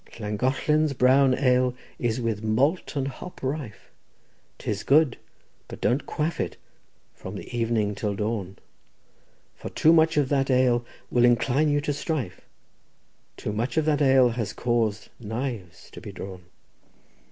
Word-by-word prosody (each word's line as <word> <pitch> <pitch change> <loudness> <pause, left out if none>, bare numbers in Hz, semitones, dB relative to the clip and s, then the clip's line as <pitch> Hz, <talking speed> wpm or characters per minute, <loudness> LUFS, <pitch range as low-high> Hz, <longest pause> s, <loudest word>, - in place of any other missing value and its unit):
— - - -14
"'Llangollen's 135 +8 +1
brown 130 +1 +4
ale 125 -2 +2 0.2
is 120 0 0
with 115 -3 -2
malt 135 +12 +1
and 135 -1 -1
hop 140 +5 -9
rife; 130 -5 -5 0.7
'Tis 105 -1 -3
good; 145 -3 +3 0.5
but - - -9
don't 125 +7 0
quaff 155 +2 -2
it - - -3 0.6
from - - -8
evening 115 -3 -1
till 100 0 -2
dawn; 100 -2 -3 1.0
For - - -8
too 160 - +4
much 160 -1 +4
of 140 -3 +2
that 135 -1 +1
ale 125 -2 +3 0.3
will 120 - +3
incline 125 +5 +3
you 145 0 +2
to 145 0 -1
strife; 145 - -3 1.0
Too 105 - -4
much 120 +8 -2
of 160 - +3
that 150 -1 +2
ale 130 -3 +5
has 115 -3 -3
caused 115 -3 -1
knives 110 -4 -5
to - - -10
be - - -8
drawn. 95 -2 -9
125 Hz, 145 wpm, -25 LUFS, 110-140 Hz, 1.0 s, ale